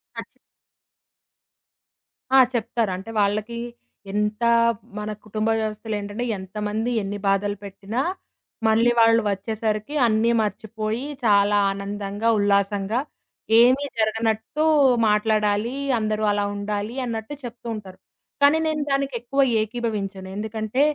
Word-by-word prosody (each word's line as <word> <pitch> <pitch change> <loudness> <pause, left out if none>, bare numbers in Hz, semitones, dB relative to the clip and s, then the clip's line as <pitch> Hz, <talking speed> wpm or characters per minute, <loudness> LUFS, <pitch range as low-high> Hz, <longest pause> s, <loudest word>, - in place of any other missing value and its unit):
ఖచ్చి - - -9 2.0
ఆ! - - +8 0.2
చెప్తారు. 230 -2 -1
అంటే 195 +4 -9
వాళ్ళకి 215 +3 -1 0.6
ఎంత 210 +2 -1 0.5
మన 210 0 -4 0.2
కుటుంబ 215 +1 -1
వ్యవస్థలేంటంటే 215 +1 -3
ఎంతమంది 210 +4 -3
ఎన్ని 200 +1 -4
బాధలు 205 +1 +1
పెట్టినా, 200 +4 -4 0.7
మళ్ళీ 225 +2 +4
వాళ్ళు 230 0 +5
వచ్చేసరికి 215 +5 -2
అన్నీ 225 +1 +2
మర్చిపోయి 220 +4 -3 0.2
చాలా 205 -1 +4
ఆనందంగా, 200 +2 -4
ఉల్లాసంగా 200 +2 +1 0.6
ఏమి 255 +4 +5
జరగనట్టు 220 +5 0 0.4
మాట్లాడాలి, 210 +2 +1 0.2
అందరూ 215 0 -1
అలా 205 0 0
ఉండాలి 205 +3 -3
అన్నట్టు 225 +3 -4
చెప్తూ 240 0 -8
ఉంటారు. 195 -3 -10 0.4
కానీ 285 +3 +6
నేను 310 -1 -1
దానికెక్కువ 275 -1 0 0.2
ఏకీభవించను. 210 -4 -3
ఎందుకంటే 220 +4 -2
215 Hz, 100 wpm, -23 LUFS, 205-230 Hz, 2.0 s, ఆ